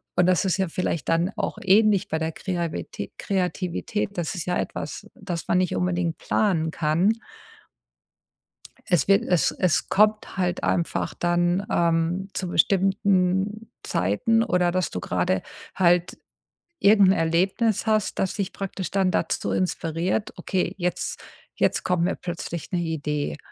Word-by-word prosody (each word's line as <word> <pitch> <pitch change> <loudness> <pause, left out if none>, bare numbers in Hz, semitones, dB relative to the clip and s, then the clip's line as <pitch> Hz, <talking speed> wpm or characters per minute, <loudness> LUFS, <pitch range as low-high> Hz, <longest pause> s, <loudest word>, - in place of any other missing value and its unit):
Und 180 - +4
das 185 +2 +3
ist 185 -1 +1
ja 190 -1 +1
vielleicht 165 -3 -2
dann 170 +4 +2
auch - - -2
ähnlich 205 0 +4
bei 160 - -1
der 160 0 -1
Kreavitä 175 -3 -4
Kreativität. 190 +2 -2
Das 170 0 -2
ist 170 - -4
ja 180 - 0
etwas, - - -5
das 180 -4 -5
man 175 - +2
nicht 185 -2 0
unbedingt 175 -2 -1
planen 170 -7 +1
kann. 165 +6 +2 1.7
Es 175 -6 +2
wird 195 0 +5
es 175 -6 +2
es 165 -7 +1
kommt 215 +1 +2
halt 180 -2 -1
einfach 170 - -1
dann, 175 +2 +1
ähm, 170 +3 +1
zu 185 - -3
bestimmten 195 +3 +1
Zeiten 105 - +1
oder 180 -6 +1
dass 185 0 0
du 90 - -4
grade 90 +1 0 0.3
halt 175 -1 +2 0.6
irgendein 200 -2 +5
Erlebnis 185 +7 +1
hast, 215 -2 +1
das 190 - 0
dich 200 -3 -3
praktisch 195 -1 -5
dann 190 -2 +2
dazu 165 - -1
inspiriert: 180 +2 -1
„Okay, 185 -2 -1
jetzt 180 -1 -2 0.3
jetzt - - +1
kommt 180 -2 +1
wir 185 - 0
plötzlich 170 -2 -6
'ne 180 - 0
Idee. 150 -3 -2
180 Hz, 145 wpm, -24 LUFS, 170-195 Hz, 1.7 s, wird